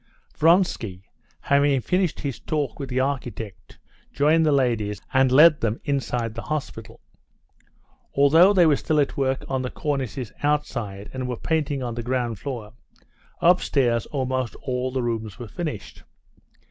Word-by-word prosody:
Vronsky, 150 - +2 0.4
having 140 -1 +3
finished 180 +6 0
his 140 -4 -4
talk 145 -6 -3
with 135 -2 -5
the 130 0 -1
architect, 125 -7 -4 0.3
joined 155 +3 +3
the - - +4
ladies, 115 -7 +1
and 130 -1 +4
led 150 +3 +7
them 115 0 -1
inside 125 -5 -1
the 115 - -6
hospital. 155 +1 -5 1.1
Although 160 +7 +6
they 185 -4 +5
were 150 -3 +4
still 155 -1 0
at 145 - 0
work 135 -1 -1
on 130 -1 -1
the 125 - -3
cornices 135 -6 -3
outside 120 -9 -2
and 130 -1 -4
were 125 -2 -3
painting 145 -3 -1
on 120 -1 -3
the 120 - -4
ground 120 -3 -2
floor, 115 -4 -6 0.7
upstairs 135 -9 +2
almost 130 -3 -2
all 130 -1 -2
the 130 -1 -2
rooms 110 -4 -3
were 120 - -7
finished. 150 - -6
130 Hz, 145 wpm, -24 LUFS, 120-145 Hz, 1.1 s, led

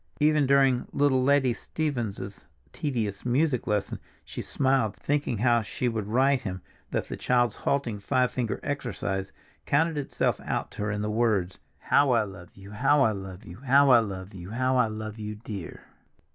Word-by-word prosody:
Even 150 -2 +3
during 135 -2 +3
little 140 -2 +2
Letty 135 -2 +3
Stevens's 115 - -4 0.3
tedious 115 -9 -2
music 130 +1 +1
lesson 105 -1 -1 0.3
she - - -6
smiled, 130 -6 +1
thinking 145 -5 -1
how 120 +1 +3
she 115 +4 -3
would 110 -4 -2
write 130 +4 +3
him 95 -4 -5 0.3
that - - -1
the - - -5
child's 120 -3 +1
halting 125 -7 -1
five 125 +4 +1
finger 120 -4 -2
exercise 100 -9 -3 0.4
counted 160 +1 +2
itself 140 - -1
out - - -3
to - - -7
her 105 0 -1
in 105 0 -2
the 105 - -1
words, 105 -5 0 0.2
"How 140 -1 +3
I 115 -2 +3
love 90 -4 -10
you, 95 +1 -12
how 135 +7 +3
I 110 - +3
love 95 -2 -8
you, 90 0 -10
how 135 +2 +4
I 120 - +8
love 100 -2 -5
you, 90 -1 -9
how 130 +4 0
I 125 - +4
love 110 0 -6
you, 105 0 -5
dear!" 105 -4 -8
120 Hz, 175 wpm, -27 LUFS, 105-135 Hz, 0.4 s, I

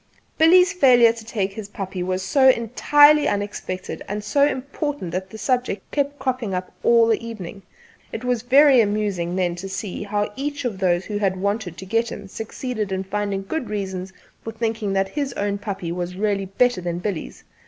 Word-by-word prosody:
Billy's 360 +4 +6
failure 245 -9 +6
to 230 -1 -10
take 205 -3 -2
his 215 -1 -7
puppy 190 -2 -5
was 185 +1 -2
so 265 +6 +5
entirely 290 +5 +5
unexpected 200 -2 -4
and 205 +1 -4
so 280 +7 +3
important 280 - -4
that 185 +2 -4
the 220 - -9
subject 230 -2 -2
kept 285 0 -1
cropping 255 -7 -2
up 180 0 -4
all 235 -1 +5
the 225 0 +1
evening. 205 -4 -7 0.5
It 225 - -6
was 250 -2 0
very 265 +1 +6
amusing 205 -5 -1
then 180 -2 0
to 195 +2 -6
see 190 0 -5
how 205 0 -2
each 285 0 -4
of 210 -6 -3
those 180 -1 +1
who 205 -1 -3
had 190 -2 0
wanted 200 -2 -2
to 190 - -8
get 230 +4 0
him 200 - -7
succeeded 220 0 -5
in 190 0 -1
finding 200 0 -2
good 255 +5 -4
reasons 190 -3 -4 0.3
for 225 - -5
thinking 225 -2 -2
that 195 0 +1
his 280 -3 -3
own 200 -1 -2
puppy 195 -5 -4
was 175 +1 -4
really 200 0 0
better 220 +1 +1
than 175 -1 -3
Billy's. 180 -2 -5
210 Hz, 185 wpm, -22 LUFS, 190-250 Hz, 0.5 s, Billy's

